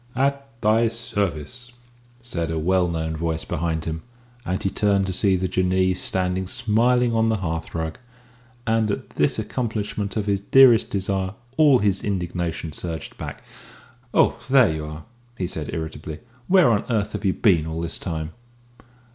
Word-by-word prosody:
"At 140 +1 0
thy 110 +2 +4
service!" 115 - -3 0.5
said 85 -9 -3
a 80 - -2
well 90 +3 +2
known 80 -1 -2
voice 80 0 -2
behind 80 0 -2
him, 80 0 -3 0.4
and 95 -5 -2
he 95 - 0
turned 100 -2 +2
to 95 - -2
see 95 0 +3
the 95 0 0
Jinnee 95 +1 +2
standing 95 0 0
smiling 125 +1 +2
on 115 0 +2
the 110 - +1
hearthrug 80 -2 -4 0.7
and 110 -2 +2
at 100 - -4
this - - +1
accomplishment 105 -4 -3
of 105 - -1
his 100 -1 +1
dearest 120 +2 +6
desire 95 0 -1 0.2
all 150 -4 +6
his 100 -4 +1
indignation 90 -4 -2
surged 80 -1 -5
back. - - -7 0.7
"Oh, - - +3
there 130 -10 +5
you 80 -1 -4
are!" 75 0 -8 0.3
he 95 - -1
said 80 -4 -5
irritably. 80 -1 -5 0.3
"Where 180 -9 +5
on 105 -2 +2
earth 105 -3 0
have - - -5
you 95 -2 +2
been 85 -8 +3
all 80 0 -4
this 85 -1 -3
time?" 80 -3 -4
95 Hz, 160 wpm, -23 LUFS, 80-110 Hz, 0.7 s, dearest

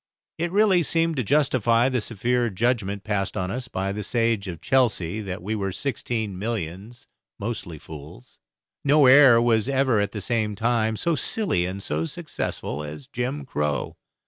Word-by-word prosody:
It 170 +1 -1
really 200 -2 +4
seemed 165 0 +1
to 130 - +1
justify 125 -3 +3
the 130 -3 0
severe 120 +3 0
judgment 100 -1 -1
passed 100 -2 -2
on 90 0 -2
us 125 +2 -4
by 95 -3 -2
the 105 +2 -4
sage 115 -1 0
of 85 -3 -6
Chelsea, 110 -7 +1
that 95 -3 -6
we 105 +3 -2
were 100 -3 -2
"sixteen 110 -4 -3
millions, 105 +1 -5 0.3
mostly 100 -6 -5
fools." 75 -4 -12 0.4
No 145 0 +5
air 130 -2 +8
was 115 0 +2
ever 130 -4 +2
at 100 0 0
the 105 - -5
same 110 0 -1
time 110 0 +1
so 170 - 0
silly 155 - 0
and 95 +1 -5
so 80 +2 -1
successful 75 -2 -4
as 75 - -8
"Jim 135 +2 -4
Crow." 75 - -2
115 Hz, 165 wpm, -24 LUFS, 95-130 Hz, 0.4 s, air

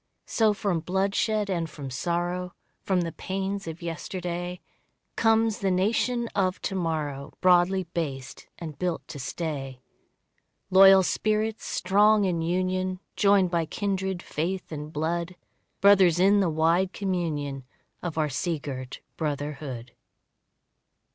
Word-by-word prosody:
So 220 -2 +2
from 195 -4 0
bloodshed 195 +4 0
and 170 -4 -2
from 140 -3 -8
sorrow, 175 +6 -2 0.3
From 185 -2 +1
the 165 -1 -3
pains 195 +1 -4
of 165 +1 -7
yesterday, 175 +1 -4 0.6
Comes 225 -1 +3
the 195 -3 0
nation 230 +6 +1
of 185 -1 0
to - - -2
morrow 155 -6 -3
Broadly 185 +1 +4
based 145 -7 -5
and 155 -4 -8
built 180 -2 -2
to 145 - -7
stay. 135 -3 -5 0.9
Loyal 195 0 +8
spirits 215 +3 0
strong 210 +1 +3
in 175 -3 0
union, 185 +2 -1 0.2
Joined 200 -3 +4
by 165 -2 0
kindred 190 -2 -2
faith 180 +5 -3
and 150 0 -6
blood; 170 +3 -2 0.5
Brothers 190 -4 +6
in 200 +2 +5
the 190 -4 +2
wide 165 +4 +2
communion 155 -8 -2 0.4
Of 170 -3 -5
our 155 -1 +2
sea 160 +4 -1
girt 130 -3 -7 0.2
brotherhood. 145 -5 -4
180 Hz, 125 wpm, -26 LUFS, 160-195 Hz, 0.9 s, Loyal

